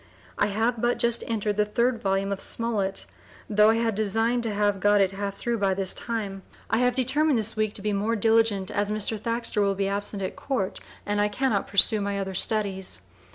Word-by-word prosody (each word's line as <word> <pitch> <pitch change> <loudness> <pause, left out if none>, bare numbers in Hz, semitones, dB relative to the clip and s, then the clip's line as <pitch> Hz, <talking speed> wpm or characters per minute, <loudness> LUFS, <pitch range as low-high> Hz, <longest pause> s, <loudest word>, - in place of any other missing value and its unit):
I 205 - +1
have 220 +3 -1
but 240 0 +1
just 235 0 +2
entered 210 -2 -1
the 210 - +4
3d 235 +3 +1
volume 195 0 0
of 200 - -3
Smollett, 205 -5 -1 0.4
tho' 210 0 +4
I 225 - +4
had 230 0 0
designed 225 +4 0
to 230 -2 -2
have 205 -1 0
got 205 +1 +4
it 195 -1 +3
half 200 0 -4
through 235 +2 -2
by 195 -1 +1
this 190 -1 +1
time. 210 -5 -4 0.3
I 225 - +2
have 250 0 +2
determined 270 +2 +2
this 220 0 -2
week 215 -1 -1
to 200 - -5
be 210 -1 0
more 210 +3 0
diligent, 225 -3 +2
as 205 0 0
Mr. 215 +1 -1
Thaxter 230 -1 -1
will 200 -1 +1
be 195 0 -1
absent 200 0 -3
at 185 - -4
Court 245 -9 -3 0.3
and 205 0 0
I 205 - +3
Cannot 210 0 -1
pursue 205 +2 +4
my 200 0 -2
other 190 -1 -3
Studies. 190 - 0
210 Hz, 210 wpm, -25 LUFS, 200-230 Hz, 0.4 s, the